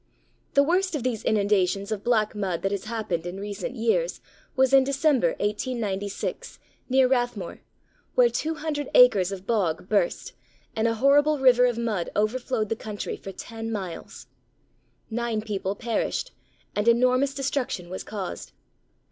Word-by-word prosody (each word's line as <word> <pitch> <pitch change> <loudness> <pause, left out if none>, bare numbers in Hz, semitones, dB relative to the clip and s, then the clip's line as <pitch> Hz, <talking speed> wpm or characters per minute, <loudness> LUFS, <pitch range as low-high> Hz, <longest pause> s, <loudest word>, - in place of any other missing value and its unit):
The 280 - +6
worst 360 +3 +1
of 280 - -3
these 245 -4 -2
inundations 200 -1 +1
of 210 -2 -3
black 220 -3 +2
mud 190 -5 -2
that 195 - 0
has 200 0 -3
happened 215 -7 -3
in 180 +2 -6
recent 205 +4 -5
years 245 - 0 0.4
was 265 0 +3
in 270 -1 +7
December, 275 - +2
1896, 205 -2 -3 0.3
near 260 0 +5
Rathmore, 245 -8 -1 0.6
where - - +6
200 310 - -3
acres 200 -7 +6
of 195 -1 -7
bog 185 -7 0
burst 200 -4 0 0.4
and 220 +1 +1
a 230 - 0
horrible 290 +5 +4
river 250 -2 +5
of 240 -2 -1
mud 220 -7 -1
overflowed 220 +1 0
the 225 - 0
country 215 -2 -5
for 195 - -8
ten 225 +2 -7
miles. 190 -6 -6 0.9
Nine 235 -1 -1
people 205 -2 -3
perished, 230 +1 -2 0.4
and 210 +2 0
enormous 255 +3 +3
destruction 270 -9 -2
was 185 +2 -6
caused. 200 -4 -6
225 Hz, 145 wpm, -25 LUFS, 200-260 Hz, 0.9 s, in